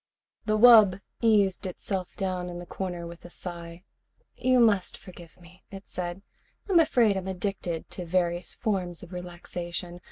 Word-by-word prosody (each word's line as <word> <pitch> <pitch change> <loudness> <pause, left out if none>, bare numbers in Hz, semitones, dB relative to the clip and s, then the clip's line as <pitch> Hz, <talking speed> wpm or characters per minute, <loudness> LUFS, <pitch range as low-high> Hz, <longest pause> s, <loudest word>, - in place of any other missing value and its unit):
The 215 0 +2
wub 215 -5 +8 0.2
eased 205 -5 +3
itself 185 0 -4
down 185 -2 -2
in 175 - -6
the 175 - -7
corner 175 -1 -5
with 170 0 -10
a 175 - -10
sigh. 170 -1 -8 0.5
"You 255 0 +3
must 210 -5 +3
forgive 175 -2 -14
me," 180 +2 -18
it 195 0 -10
said. 180 +2 -5 0.4
"I'm 375 -4 +5
afraid 240 -10 +4
I'm 190 0 -4
addicted 185 -3 -3
to 180 - -4
various 175 0 0
forms 185 -6 -2
of 180 +1 -11
relaxation. 175 0 -6
185 Hz, 155 wpm, -27 LUFS, 175-200 Hz, 0.5 s, wub